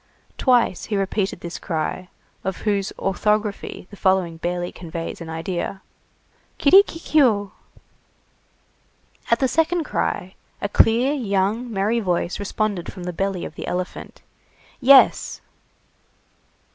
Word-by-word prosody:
Twice 245 -7 +2
he 210 - -2
repeated 195 -1 -1
this 170 0 -6
cry, 175 +2 -3 0.3
of 190 -1 -3
whose 200 -2 0
orthography 210 +1 -1
the - - -10
following 190 -4 +1
barely 175 +1 -3
conveys 165 0 -6
an 165 - -7
idea:— 175 +3 -4 0.7
"Kirikikiou!" 290 - +4 1.8
At 235 - +4
the 265 - +2
second 325 +4 +1
cry, 185 -9 -2 0.3
a 205 - -2
clear, 235 +6 +4
young, 220 -1 -1
merry 215 +3 +1
voice 180 -3 -1
responded 205 -2 -2
from 185 - -9
the 180 0 -4
belly 195 0 -2
of - - -8
the - - -7
elephant:— 180 +1 -5 0.6
"Yes!" 270 0 +5
195 Hz, 115 wpm, -22 LUFS, 180-230 Hz, 1.8 s, Yes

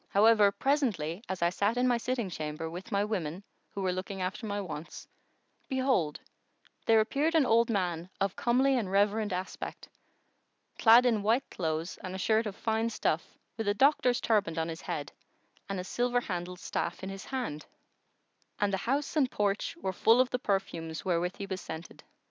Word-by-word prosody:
However, 210 0 +5
presently, 210 - 0
as 190 -2 -2
I 170 - +3
sat 205 +5 0
in 250 +1 +3
my 240 -1 +2
sitting 240 -2 -1
chamber, 155 -2 -4
with 185 +6 -8
my 200 0 +2
women 185 -4 -3 0.3
who 200 - -5
were 185 - +1
looking 190 +1 -5
after 195 +5 -3
my 205 0 -2
wants, 165 -5 -7 0.6
behold, 260 - +1 0.7
there 225 -1 +6
appeared 290 +9 0
an 310 -4 +5
old 230 0 +4
man 180 -5 -1
of 195 -1 0
comely 260 +3 +3
and 195 -5 -3
reverend 205 +2 +2
aspect,[FN#119] 185 +1 -9
clad 235 +2 +8
in 225 -4 +3
white 230 +6 +2
clothes 160 0 -3
and 185 0 -5
a - - -3
shirt 220 +3 +2
of 200 - -5
fine 225 +1 0
stuff 220 - -2 0.2
with 225 -2 -3
a 205 - +2
doctor's 255 -1 +4
turband 200 -8 +1
on 160 0 -1
his 165 +2 -6
head - - -4 0.6
and 195 -1 -2
a - - -3
silver 245 +5 0
handled 180 -3 -4
staff - - -3
in 190 - -4
his 195 0 -7
hand, 245 - -4 0.9
and 205 -1 +1
the - - +2
house 285 +4 0
and 275 -5 +3
porch 205 +10 -1
were 190 - -3
full 225 +6 +4
of 255 0 +3
the 250 - 0
perfumes 165 - -2
wherewith 180 0 0
he 200 - -5
was 190 -2 -4
scented. 160 +1 -8
200 Hz, 185 wpm, -30 LUFS, 180-235 Hz, 0.9 s, clad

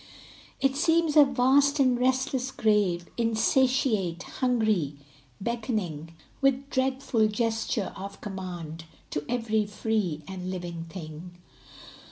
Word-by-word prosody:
It 270 0 +2
seems 325 +1 +2
a 300 - +10
vast 275 +2 +3
and 255 -2 +4
restless 260 0 +1
grave, 205 -7 +1
Insatiate, 230 -5 +2
hungry, 215 - 0 0.4
beckoning 195 - -3 0.3
With 275 0 +1
dreadful 260 -4 +1
gesture 225 -1 -1
of 195 +1 -8
command 175 -5 -6 0.3
To 145 - -2
every 220 -3 0
free 205 -7 -1
and 185 -1 -5
living 175 -2 -5
thing. 170 0 -9
220 Hz, 105 wpm, -27 LUFS, 180-260 Hz, 0.4 s, a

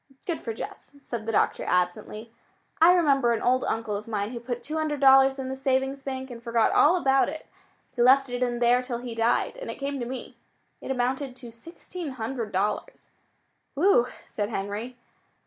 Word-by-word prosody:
"Good 340 -3 -3
for 230 - -4
Jess," 220 - -8
said 230 -2 -6
the - - 0
doctor - - +1
absently. 180 +5 -1 0.5
"I 335 +2 +8
remember 275 -8 +3
an 230 - -2
old 255 +1 +2
uncle 220 -2 -2
of 210 +2 -6
mine 210 -1 -2
who 240 - -5
put 240 0 -5
two 310 +2 -4
hundred 305 -2 -1
dollars 270 0 +6
in 265 -1 -4
the 265 - -3
savings 265 +1 0
bank 265 -1 -5
and 235 -1 -9
forgot 230 -1 +2
all 325 +5 +5
about 270 -6 +3
it. 310 +1 -7 0.5
He 245 - 0
left 270 +3 +6
it 245 0 -4
in 245 -1 0
there 240 +1 +3
till 250 -2 -4
he 240 0 -6
died, 230 - +1
and - - -7
it - - -4
came 280 0 -4
to 240 - -4
me. 255 +1 -7 0.4
It - - -8
amounted 260 +1 -1
to 245 -2 -11
sixteen 330 +5 -8
hundred 230 -2 -4
dollars." 205 - -2 0.7
"Whew!" 295 -6 +4 0.2
said 205 -1 -3
Henry. 215 +4 -4
250 Hz, 195 wpm, -26 LUFS, 230-275 Hz, 0.7 s, I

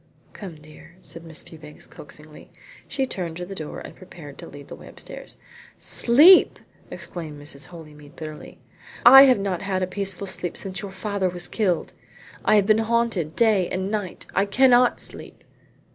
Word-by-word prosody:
"Come, 190 -6 -9
dear," 155 +3 -17
said 165 - -8
Miss 165 -1 -7
Fewbanks 155 -2 -13
coaxingly. 150 +1 -15 0.4
She 270 -1 -2
turned 175 -9 -5
to 180 - -6
the 195 - -9
door 155 -5 -7
and - - -11
prepared 160 -6 -13
to - - -9
lead 145 0 -12
the - - -9
way - - -14
upstairs. - - -9 0.4
"Sleep!" 300 +11 +6 0.3
exclaimed 155 -4 -8
Mrs. 145 0 -5
Holymead 150 -4 -14
bitterly. 155 -1 -10 0.5
"I 270 +3 +10
have 255 -2 +4
not 195 -3 -3
had 190 -1 -2
a - - +2
peaceful 195 0 -4
sleep 180 -2 -2
since 190 -1 -4
your 200 - -7
father 190 0 -2
was 175 0 -3
killed. 185 -7 -1 0.5
I - - +3
have 205 -2 +3
been 215 +1 +3
haunted 225 -8 -1
day 215 -6 +2
and 190 +2 -3
night. 205 -4 -4
I 195 - +2
cannot 250 +2 +4
sleep." - - -8
185 Hz, 170 wpm, -23 LUFS, 160-210 Hz, 0.5 s, I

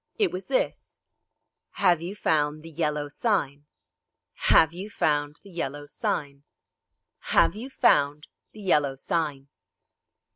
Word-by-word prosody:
It 420 -4 +2
was 185 +1 -6
this: - - -2 0.8
"Have 175 -4 +3
you 180 +4 -5
found 155 -5 0
the 165 - -10
Yellow 150 -1 -1
Sign?" 145 - -1 0.8
"Have 160 0 +6
you 190 +4 -7
found 145 -5 0
the 200 - -14
Yellow 145 -4 -4
Sign?" 140 -1 -3 0.9
"Have - - +5
you 240 +5 -7
found 145 - +2 0.3
the 215 - -12
Yellow 150 -8 +2
Sign?" 140 -1 -2
150 Hz, 120 wpm, -26 LUFS, 145-185 Hz, 0.9 s, Have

